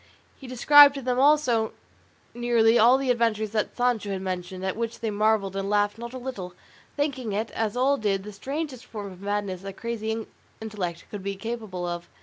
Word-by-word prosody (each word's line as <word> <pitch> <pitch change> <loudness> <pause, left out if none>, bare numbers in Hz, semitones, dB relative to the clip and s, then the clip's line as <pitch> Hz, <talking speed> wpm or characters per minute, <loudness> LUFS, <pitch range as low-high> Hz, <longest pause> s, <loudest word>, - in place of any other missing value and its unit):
He 265 - -12
described 285 +3 +7
to 275 - -5
them 250 0 0
also 265 -6 +3 0.6
nearly 235 -1 +3
all 240 +4 +6
the 270 -2 +1
adventures 225 -3 0
that 215 -1 -2
Sancho 245 -4 +1
had 190 -1 -3
mentioned, 185 0 -4
at 190 - -1
which 230 +1 -4
they 225 -2 -2
marvelled 205 -2 +1
and 195 0 -2
laughed 205 +1 +1
not 235 0 -6
a - - -4
little, 205 -9 -6 0.4
thinking 265 -7 -2
it, 215 +2 -2
as 225 +1 -2
all 275 +3 +3
did, 200 -4 -1
the 210 +1 -9
strangest 270 +3 -5
form 210 -5 -7
of 185 0 -13
madness 200 -2 -3
a 195 - -5
crazy 220 +1 -4 0.3
intellect 195 -6 -5
could 205 - -6
be 200 +1 -3
capable 210 -4 -5
of. 175 0 -5
220 Hz, 190 wpm, -26 LUFS, 195-245 Hz, 0.6 s, described